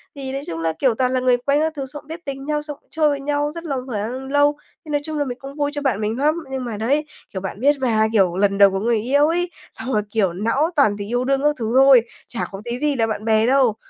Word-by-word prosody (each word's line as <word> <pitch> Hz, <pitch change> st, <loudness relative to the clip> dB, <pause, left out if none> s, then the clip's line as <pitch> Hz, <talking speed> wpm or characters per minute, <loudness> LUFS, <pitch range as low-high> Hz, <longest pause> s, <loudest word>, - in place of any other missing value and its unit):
Thì, 270 Hz, -1 st, -6 dB
nói 275 Hz, -, -3 dB
chung 165 Hz, 0 st, -4 dB
là, 165 Hz, 0 st, 0 dB
kiểu, 255 Hz, -5 st, +2 dB
toàn 255 Hz, +1 st, 0 dB
là 255 Hz, -, +2 dB
người 250 Hz, -1 st, +3 dB
quen 280 Hz, +4 st, +1 dB
các 315 Hz, 0 st, 0 dB
thứ, 275 Hz, -2 st, -4 dB
xong 290 Hz, +2 st, -9 dB
cũng -, -, -27 dB
biết 325 Hz, +2 st, -8 dB
tính 275 Hz, -1 st, -5 dB
nhau, 300 Hz, 0 st, -1 dB
xong 295 Hz, -1 st, -8 dB
cũng -, -, -39 dB
chơi 310 Hz, -1 st, +2 dB
với 285 Hz, -, -1 dB
nhau 290 Hz, +1 st, -1 dB
rất 335 Hz, -, -6 dB
là 295 Hz, -5 st, -3 dB
khoảng 250 Hz, +4 st, -4 dB
lâu, 290 Hz, 0 st, +4 dB, 0.3 s
thì, -, -, -11 dB
nói 290 Hz, -1 st, +1 dB
chung 310 Hz, -1 st, -4 dB
là, 290 Hz, -, 0 dB
mình 245 Hz, -2 st, -5 dB
cũng 275 Hz, +1 st, -9 dB
vui 290 Hz, -1 st, -1 dB
cho 290 Hz, -, -3 dB
bạn 255 Hz, -7 st, 0 dB
mình 215 Hz, +2 st, -1 dB
lắm, 300 Hz, +3 st, +2 dB, 0.2 s
nhưng 260 Hz, -2 st, -3 dB
mà 220 Hz, -3 st, -4 dB
đấy, 280 Hz, +8 st, +1 dB, 0.3 s
kiểu, 190 Hz, -, -4 dB
bạn 190 Hz, +2 st, -6 dB
biết 285 Hz, +3 st, +4 dB
mà, 220 Hz, -4 st, +2 dB
kiểu, 190 Hz, -5 st, +3 dB
lần 200 Hz, 0 st, +2 dB
đầu 200 Hz, -1 st, +7 dB
có 195 Hz, -, -1 dB
người 225 Hz, +1 st, +1 dB
yêu 285 Hz, +6 st, +3 dB
ấy, 350 Hz, +2 st, -1 dB, 0.2 s
xong 260 Hz, -, -5 dB
là, 210 Hz, -, +3 dB
kiểu, 200 Hz, -6 st, +1 dB
não 230 Hz, -, +1 dB
toàn 270 Hz, -9 st, +4 dB
tình 205 Hz, +1 st, -6 dB
yêu 245 Hz, +1 st, 0 dB
đương 275 Hz, 0 st, +1 dB
các 295 Hz, 0 st, +3 dB
thứ 225 Hz, 0 st, -2 dB
thôi, 270 Hz, -2 st, +8 dB, 0.3 s
chả 235 Hz, -, -4 dB
có 195 Hz, 0 st, -7 dB
tí 240 Hz, +1 st, -3 dB
gì 295 Hz, 0 st, +1 dB
là 225 Hz, -3 st, +1 dB
bạn 215 Hz, -1 st, -4 dB
bè 220 Hz, -1 st, +3 dB
đâu. 260 Hz, -4 st, +3 dB
265 Hz, 300 wpm, -21 LUFS, 220-290 Hz, 0.3 s, thôi